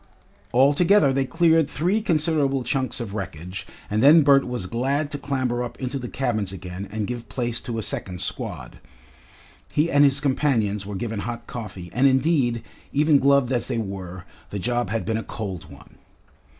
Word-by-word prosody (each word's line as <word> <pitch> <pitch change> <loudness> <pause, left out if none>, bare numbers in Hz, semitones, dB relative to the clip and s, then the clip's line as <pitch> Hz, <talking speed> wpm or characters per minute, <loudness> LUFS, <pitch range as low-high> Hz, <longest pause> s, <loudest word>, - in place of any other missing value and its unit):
All 135 +4 +5
together 170 -3 +4
they 135 0 +1
cleared 165 0 +3
three 180 +9 0
considerable 155 - +1
chunks 130 -1 -1
of 110 -5 -5
wreckage, 90 -2 -6 0.2
and 105 +1 0
then 155 +4 +7
Bert 140 -2 +5
was 125 -6 -3
glad 135 +8 -1
to 145 - -4
clamber 130 -4 -1
up 120 -1 -6
into 130 +1 -3
the 120 -2 -6
cabins 110 -8 -1
again 95 0 -7
and 110 0 -2
give 120 +1 -6
place 120 -2 -2
to 115 -2 -5
a 110 - -2
second 90 -2 -3
squad. - - -4 0.9
He 155 +3 +1
and 145 0 +5
his 140 0 +4
companions 120 -8 0
were 105 - -5
given 110 +2 -3
hot 120 +2 -5
coffee, 95 -8 -7
and 130 +3 +4
indeed, 130 -4 +2 0.3
even 150 0 +4
gloved 140 -2 +3
as 120 -3 +1
they - - -2
were, 95 -4 -5 0.2
the 100 - -4
job 120 +1 -1
had 115 +1 -2
been 110 -1 0
a 115 - -3
cold 95 -6 -6
one. - - -16
125 Hz, 180 wpm, -24 LUFS, 110-140 Hz, 0.9 s, then